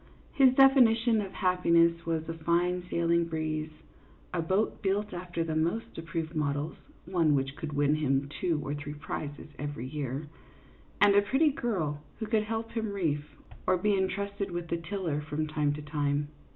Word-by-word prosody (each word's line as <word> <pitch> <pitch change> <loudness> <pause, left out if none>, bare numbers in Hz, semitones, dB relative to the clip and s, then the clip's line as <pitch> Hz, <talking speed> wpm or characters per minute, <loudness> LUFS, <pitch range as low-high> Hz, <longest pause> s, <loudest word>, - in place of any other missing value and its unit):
His 260 -2 +5
definition 240 -4 +6
of 195 -2 -5
happiness 170 -2 +3
was 160 -1 -1
a 165 - -3
fine 170 +2 +1
sailing 170 0 +2
breeze, 155 -1 -2 0.6
a 175 - 0
boat 190 +6 0
built 205 +1 0
after 175 -1 -3
the 160 -1 -3
most 170 +8 -1
approved 165 0 -4
models 145 +1 -1 0.3
(one 165 -4 +2
which 135 0 -1
could 150 0 -5
win 145 0 +3
him 140 -2 +1
two 155 +2 -1
or 145 - -2
three 145 0 -6
prizes 145 0 -6
every 145 -4 -4
year), 140 +1 -4 0.7
and 205 -1 +7
a 205 - +6
pretty 270 +9 +3
girl 170 - -2 0.2
who 220 - -3
could 215 -1 +1
help 225 +1 -3
him 220 -2 -2
reef 160 -7 0 0.4
or 185 - +4
be 205 +3 +2
entrusted 200 +1 -1
with 175 -1 -4
the 170 - 0
tiller 165 -3 -3
from 155 +1 -2
time 150 -1 0
to 150 0 -6
time. 145 -1 -1
165 Hz, 170 wpm, -29 LUFS, 150-200 Hz, 0.7 s, and